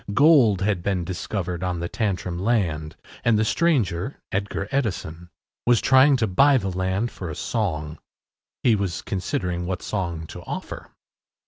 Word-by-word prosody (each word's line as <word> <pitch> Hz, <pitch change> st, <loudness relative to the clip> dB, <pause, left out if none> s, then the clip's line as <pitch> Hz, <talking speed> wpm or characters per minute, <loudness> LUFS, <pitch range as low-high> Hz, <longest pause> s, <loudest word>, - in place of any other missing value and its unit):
Gold 135 Hz, -, +5 dB
had 100 Hz, -2 st, +1 dB
been 90 Hz, -1 st, -1 dB
discovered 90 Hz, 0 st, -4 dB
on 90 Hz, -2 st, -1 dB
the 85 Hz, -, -2 dB
Tantrum 90 Hz, -4 st, -2 dB
land, 90 Hz, -8 st, 0 dB, 0.3 s
and 115 Hz, -2 st, +3 dB
the 110 Hz, -, +2 dB
stranger, 125 Hz, -, +1 dB
Edgar 100 Hz, 0 st, -2 dB
Edison, 90 Hz, -, -2 dB, 0.4 s
was 120 Hz, -2 st, +5 dB
trying 135 Hz, +1 st, +5 dB
to 115 Hz, -, +1 dB
buy 135 Hz, +8 st, +4 dB
the 95 Hz, -6 st, -2 dB
land 95 Hz, +5 st, -1 dB
for 90 Hz, -, -7 dB
a 75 Hz, -, -5 dB
song. 75 Hz, -9 st, -2 dB, 0.6 s
He 120 Hz, -3 st, +5 dB
was 100 Hz, -5 st, -2 dB
considering 90 Hz, -2 st, -2 dB
what 90 Hz, -1 st, -3 dB
song 85 Hz, -6 st, -3 dB
to -, -, -9 dB
offer. -, -, -7 dB
95 Hz, 150 wpm, -24 LUFS, 85-115 Hz, 0.6 s, Gold